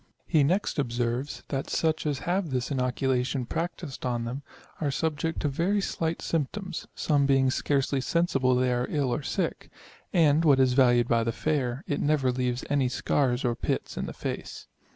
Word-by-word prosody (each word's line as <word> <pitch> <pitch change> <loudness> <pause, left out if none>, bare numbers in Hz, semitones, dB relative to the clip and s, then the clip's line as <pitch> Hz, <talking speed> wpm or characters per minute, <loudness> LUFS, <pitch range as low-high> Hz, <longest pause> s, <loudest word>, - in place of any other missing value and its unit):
He 155 -4 +3
next 175 +2 +1
observes, 120 +1 -2
that 135 -1 -3
such 160 -1 0
as 145 -2 0
have 180 0 0
this 125 0 -2
inoculation 130 0 0
practised 165 0 -4
on 120 -2 -1
them, 125 +4 -4 0.4
are 150 - +1
subject 160 +2 -1
to - - +1
very 170 +9 +1
slight 165 -4 -2
symptoms, 175 +4 -3
some 145 -3 +2
being 135 -1 +3
scarcely 135 0 0
sensible 135 -6 +2
they 125 0 +2
are 125 +1 0
ill 140 -5 0
or 150 - -2
sick; - - -2 0.4
and, 160 -2 +4
what 140 -4 +5
is 130 -1 +4
valued 120 -2 +4
by 115 -1 +2
the 115 - 0
fair, 130 -2 -1
it 145 - -2
never 145 -4 +2
leaves 125 0 -2
any 140 -3 +1
scars 130 0 0
or 120 - +2
pits - - -3
in - - -3
the - - -5
face. - - -5
135 Hz, 175 wpm, -27 LUFS, 125-155 Hz, 0.4 s, what